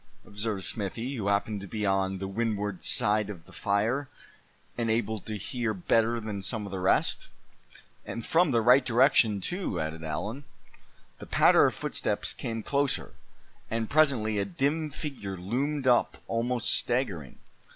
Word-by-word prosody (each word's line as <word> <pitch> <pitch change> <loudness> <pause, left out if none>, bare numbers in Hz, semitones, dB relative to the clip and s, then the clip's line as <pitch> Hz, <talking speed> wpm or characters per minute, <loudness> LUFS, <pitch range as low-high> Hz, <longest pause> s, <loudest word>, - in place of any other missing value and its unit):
observed 100 -1 -1
Smithy, 115 +7 -4
who 110 -7 -3
happened 100 0 0
to 100 - -8
be 105 +1 -3
on 95 -1 +1
the 95 +1 -4
windward 105 -2 -2
side 105 -4 +2
of 90 -6 -8
the - - -17
fire, 110 +7 0 0.7
and 115 -1 -1
able 110 -1 0
to 110 +1 -6
hear 115 +2 -2
better 115 +5 +2
than 105 -3 -5
some 105 +2 -3
of 100 - -8
the 95 - -3
rest. 90 - +1 0.7
"And 115 - -6
from 170 0 +3
the 115 -4 +2
right 125 +3 +6
direction, 120 -5 +4
too," 175 - -2
added 80 +1 -4
Allan. 105 - -4 0.7
The - - -9
patter - - +5
of - - -3
footsteps - - -1
came 115 -1 -4
closer, 140 +2 0 0.6
and 115 -1 -2
presently 125 -9 +3
a 100 - 0
dim 145 - -1
figure 130 - -5
loomed 130 +10 -2
up, 125 -2 +3
almost 120 +1 0
staggering. 105 - -1
110 Hz, 155 wpm, -28 LUFS, 100-125 Hz, 0.7 s, right